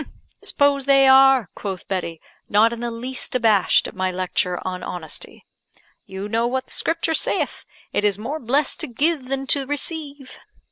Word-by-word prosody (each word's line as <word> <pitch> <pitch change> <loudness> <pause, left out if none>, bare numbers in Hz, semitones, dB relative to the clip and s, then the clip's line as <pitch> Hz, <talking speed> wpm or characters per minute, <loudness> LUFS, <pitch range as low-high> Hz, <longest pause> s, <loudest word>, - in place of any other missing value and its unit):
"S'pose 280 -1 +1
they 275 -1 +6
are," 265 -4 +6
quoth 190 -3 -6
Betty, 175 -4 -3 0.3
not 220 +3 +4
in 235 - -7
the 240 0 -3
least 250 +3 -4
abashed 220 -6 +3
at - - -9
my 185 0 -1
lecture 180 0 -1
on 185 -1 -4
honesty, 165 -4 -7 0.6
"you 190 +1 -6
know 230 +2 0
what 260 +1 -2
the - - -18
Scripture 330 0 -1
saith, - - -1 0.3
'It - - 0
is 205 -2 +2
more 265 +9 -4
blessed 270 +3 0
to 315 - -1
give 285 +2 -1
than 270 0 -3
to 270 0 +2
receive.'" 290 -1 -4
250 Hz, 170 wpm, -22 LUFS, 200-275 Hz, 0.6 s, they